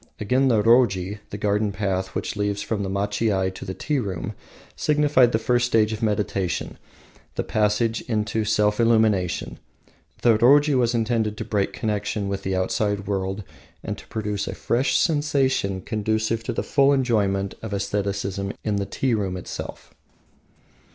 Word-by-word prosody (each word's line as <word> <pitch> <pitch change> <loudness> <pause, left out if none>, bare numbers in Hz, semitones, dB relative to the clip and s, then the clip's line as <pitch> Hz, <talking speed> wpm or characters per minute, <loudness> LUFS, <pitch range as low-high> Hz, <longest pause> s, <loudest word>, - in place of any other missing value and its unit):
Again 125 +6 +2
the 110 -5 +3
roji, 105 -4 +3
the 105 - -6
garden 105 0 0
path 95 -2 -2
which - - -3
leads 100 -1 -1
from 110 -2 -2
the 95 - -2
machiai 100 -1 0
to - - -8
the 95 0 -5
tea 150 -3 -1
room, 95 -7 -4 0.4
signified 145 -5 +3
the 110 - +2
first 120 +2 +1
stage 110 -2 +2
of 110 - -6
meditation, 100 -4 -1 0.6
the - - -1
passage 110 +2 +1
into 110 0 0
self 105 0 +1
illumination. 110 - +2 0.6
The 115 -3 +5
roji 145 +5 +5
was 120 -1 +2
intended 110 -2 0
to - - -4
break 100 -2 0
connection 105 -2 -2
with 100 0 -3
the 95 0 -2
outside 100 +2 0
world, 95 0 -2 0.4
and - - -3
produce 105 -2 -3
a - - -4
fresh 125 +3 +1
sensation 135 - +1
conducive 110 +2 -1
to - - -1
the - - -2
full 140 -1 +3
enjoyment 100 -7 +1
of 110 - -6
aestheticism 100 -1 -2
in 105 -2 0
the 100 0 -2
tea 130 -3 0
room 95 -4 -1
itself. 90 - -8
105 Hz, 155 wpm, -24 LUFS, 100-115 Hz, 0.6 s, The